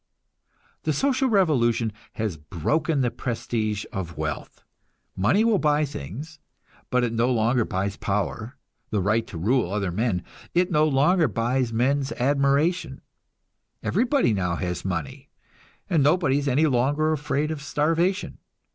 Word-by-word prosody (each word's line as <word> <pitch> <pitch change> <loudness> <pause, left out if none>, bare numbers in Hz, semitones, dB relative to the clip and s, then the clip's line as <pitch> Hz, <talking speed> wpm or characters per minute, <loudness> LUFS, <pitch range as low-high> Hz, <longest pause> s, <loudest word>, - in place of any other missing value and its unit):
The 155 - 0
social 265 - +1
revolution 120 - +2 0.2
has 110 -6 -2
broken 135 - -1
the 120 -2 +1
prestige 110 -3 -2
of 85 -4 -5
wealth. 80 -1 -5 0.5
Money 105 - +3
will 225 -4 +3
buy 150 -1 +2
things, 140 - -8 0.5
but 125 0 +2
it 115 -2 0
no 115 +2 +2
longer 120 0 +2
buys 100 +2 -2
power, 105 +5 -3 0.3
the 105 - 0
right 110 +4 +1
to 85 - -8
rule 110 +2 +1
other 100 -3 -1
men; 95 -2 -1 0.3
it 180 +2 +2
no 155 -1 +4
longer 155 +4 +3
buys 120 +2 0
men's 135 +4 +1
admiration. 140 +3 +1 0.8
Everybody 245 - +2
now 90 -4 0
has 90 0 -3
money, 90 -6 -4 0.6
and 165 -5 +2
nobody 145 -1 +3
is 145 - -3
any 140 +4 +3
longer 145 +3 +2
afraid 150 0 -1
of 155 -3 -4
starvation. 165 +7 0
130 Hz, 140 wpm, -25 LUFS, 105-155 Hz, 0.8 s, no